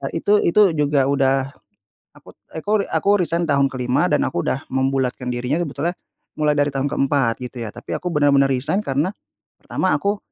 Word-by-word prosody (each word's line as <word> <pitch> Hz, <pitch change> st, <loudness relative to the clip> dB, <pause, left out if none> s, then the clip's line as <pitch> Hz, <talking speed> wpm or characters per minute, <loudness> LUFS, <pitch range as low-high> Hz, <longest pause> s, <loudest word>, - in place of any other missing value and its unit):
itu 205 Hz, +5 st, +2 dB
itu 190 Hz, +1 st, +4 dB
juga 145 Hz, -3 st, +2 dB
udah, 135 Hz, 0 st, +1 dB, 0.6 s
akut -, -, -17 dB, 0.2 s
akuri 205 Hz, +5 st, 0 dB
aku 200 Hz, +5 st, +2 dB
resign 170 Hz, 0 st, 0 dB
tahun 140 Hz, -1 st, +3 dB
ke-5 125 Hz, -1 st, 0 dB
dan -, -, +2 dB
aku 85 Hz, -, -3 dB
udah 130 Hz, -, -1 dB
membulatkan 130 Hz, -1 st, -1 dB
dirinya 125 Hz, +5 st, -1 dB
sebetulnya 165 Hz, +1 st, -2 dB, 0.5 s
mulai 150 Hz, -1 st, +2 dB
dari 145 Hz, 0 st, +1 dB
tahun 135 Hz, 0 st, -2 dB
ke-4 135 Hz, -4 st, +1 dB
gitu 125 Hz, 0 st, -7 dB
ya, 110 Hz, -, -5 dB
tapi 120 Hz, -, -9 dB
aku 180 Hz, -, -11 dB
benar-benar 140 Hz, -2 st, +4 dB
resign 140 Hz, +9 st, -1 dB
karena 145 Hz, +7 st, 0 dB, 0.5 s
pertama -, -, -1 dB
aku, 200 Hz, +1 st, -1 dB
140 Hz, 170 wpm, -21 LUFS, 130-165 Hz, 0.6 s, itu